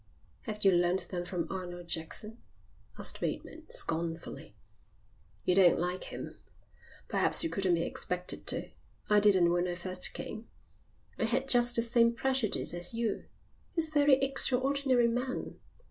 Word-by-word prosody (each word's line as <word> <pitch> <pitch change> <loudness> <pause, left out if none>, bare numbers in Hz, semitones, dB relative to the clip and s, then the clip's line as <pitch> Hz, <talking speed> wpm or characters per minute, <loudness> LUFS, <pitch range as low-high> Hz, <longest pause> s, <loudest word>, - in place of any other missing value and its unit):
"Have 210 -3 -4
you 195 - +7
learnt 175 +1 +1
them 175 -1 -4
from 175 -2 -3
Arnold 175 -2 -6
Jackson?" 190 +8 -5 0.6
asked - - -3
Bateman, - - -5
scornfully. 165 - -5 0.9
"You 180 - +3
don't 180 -2 +5
like 180 +2 -2
him? - - -8 0.7
Perhaps - - +4
you 330 - -2
couldn't 190 -3 +1
be 165 - -1
expected 180 +1 -2
to. - - 0 0.4
I 210 - +6
didn't 190 -4 +4
when 175 +1 +1
I 175 - -3
first 185 +1 -2
came. 220 - -6 0.7
I - - +1
had 255 +4 0
just 245 -1 +4
the 230 - +3
same 235 0 +3
prejudice 260 -7 0
as 175 +6 -3
you. 230 -2 -2 0.5
He's 325 -2 0
a - - -19
very 290 -2 +5
extraordinary 270 -1 +2
man. 250 +2 -3
210 Hz, 145 wpm, -31 LUFS, 175-250 Hz, 0.9 s, you